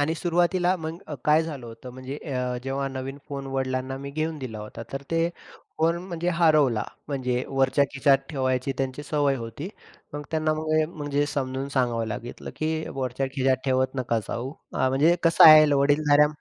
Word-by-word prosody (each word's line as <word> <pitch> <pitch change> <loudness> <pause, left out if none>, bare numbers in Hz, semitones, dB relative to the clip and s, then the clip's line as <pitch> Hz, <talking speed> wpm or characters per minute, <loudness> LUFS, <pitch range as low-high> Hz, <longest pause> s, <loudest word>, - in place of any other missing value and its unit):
आणि 155 +3 +1
सुरुवातीला 175 +2 +1
मग 160 0 -6
अ, 150 - -5
काय 155 +2 +5
झालं 145 -7 -6
होतं, 115 +3 -10
म्हणजे 130 +2 -7
अ, 125 -4 -3
जेव्हा 135 +1 -2
नवीन 135 +1 -6
फोन 140 -1 -5
वडिलांना 130 0 -2
मी 140 0 -7
घेऊन 155 +1 -2
दिला 120 -5 -6
होता 105 +2 -8
तर 135 +1 -4
ते 165 +1 +2 0.5
फोन 165 +1 +2
म्हणजे 175 0 -2
हरवला. 150 -10 +3 0.2
म्हणजे 125 -3 -1
वरच्या 135 +1 +2
खिशात 135 0 +4
ठेवायची 130 -1 0
त्यांची 135 +1 -2
सवय 145 -2 +1
होती. 120 - -6 0.4
मग 145 - -5
त्यांना 155 -1 +1
मग 155 0 -4
अ, - - +1
म्हणजे 145 -1 0
समजून 135 -1 -3
सांगावं 120 -4 0
लागलं, 115 +2 -6
की 160 0 -1
वरच्या 135 0 -2
खिशात 130 -1 +1
ठेवत 130 0 +1
नका 120 -3 0
जाऊ 120 +3 -3 0.2
हां 130 - +2
म्हणजे 155 +6 +4
कसं 165 0 +6
आहे, 155 -1 +9
वडीलधाऱ्या 145 +1 +4
140 Hz, 175 wpm, -25 LUFS, 130-155 Hz, 0.5 s, आहे